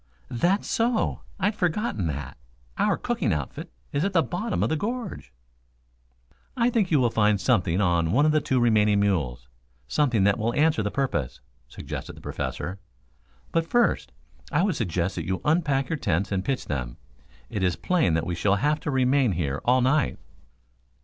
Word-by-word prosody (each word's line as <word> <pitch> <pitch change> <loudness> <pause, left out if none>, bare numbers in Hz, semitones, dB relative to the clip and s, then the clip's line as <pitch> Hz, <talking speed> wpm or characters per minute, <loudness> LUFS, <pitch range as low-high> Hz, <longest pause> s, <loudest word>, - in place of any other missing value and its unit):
"That's 175 - +1
so. 230 0 0 0.2
I'd 200 +3 +1
forgotten 175 - -1
that. 70 -1 -5 0.4
Our - - +2
cooking - - -1
outfit 75 -5 -4 0.2
is 140 - 0
at 195 +1 -1
the 165 -3 +4
bottom 200 +6 -2
of - - +1
the 160 - +1
gorge." 235 +9 -4 1.3
"I 240 0 +3
think 215 -6 +1
you 150 - +3
will 120 -3 +2
find 105 -2 +3
something 95 -8 +2
on 85 -4 +2
one 145 +7 +4
of 155 - +4
the 155 0 +2
two 130 -2 +1
remaining 105 -3 +3
mules 70 -12 0 0.4
something 125 - +2
that 100 +2 +3
will 115 +2 -1
answer 150 -5 +3
the 105 - -1
purpose," 100 - -2 0.3
suggested - - -7
the - - -13
Professor. 95 +3 -4 0.7
"But 165 0 0
first, 240 +5 +1 0.4
I 165 - +2
would 195 -3 +1
suggest 90 -4 -1
that 85 - -4
you 95 0 -1
unpack 150 -4 +2
your 160 - -2
tents 100 -3 0
and 95 -2 0
pitch 135 +2 -2
them. 65 -4 -4 0.5
It 105 - -2
is 90 -3 +1
plain 130 - +1
that 80 0 0
we 90 - -2
shall 100 +4 +2
have 150 +7 +1
to - - -4
remain 130 -3 +2
here 75 -5 -2
all 125 +1 +4
night." 135 +4 +2
120 Hz, 175 wpm, -25 LUFS, -, 1.3 s, the